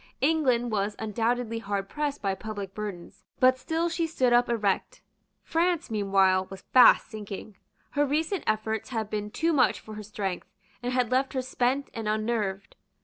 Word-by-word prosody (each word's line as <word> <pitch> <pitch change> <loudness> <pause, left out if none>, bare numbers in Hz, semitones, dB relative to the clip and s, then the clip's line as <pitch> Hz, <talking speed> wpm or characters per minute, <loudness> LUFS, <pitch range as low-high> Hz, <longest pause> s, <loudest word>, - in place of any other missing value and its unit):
England 260 -6 +2
was 205 0 -1
undoubtedly 230 +2 -1
hard 200 -3 -3
pressed 290 0 -3
by 195 -1 +1
public 200 -1 -6
burdens; 200 -3 -7 0.2
but 255 0 +5
still 330 +4 -1
she 335 -1 -1
stood 255 -6 +1
up 240 0 +4
erect. 210 -5 -1 0.4
France 340 -3 0
meanwhile 195 -3 +3
was 195 0 -10
fast 255 - +8
sinking. 210 -1 -7 0.4
Her 290 - +2
recent 315 +6 0
efforts 220 0 -1
had 220 -4 -3
been 210 -1 -2
too 330 +9 0
much 260 -4 +3
for 215 - -11
her 215 - -6
strength, 200 -3 -4 0.3
and 245 0 -2
had 250 -2 +1
left 260 +1 +1
her 260 - 0
spent 260 +2 -1
and 225 -2 -3
unnerved. 215 -3 -2
225 Hz, 165 wpm, -27 LUFS, 205-260 Hz, 0.4 s, fast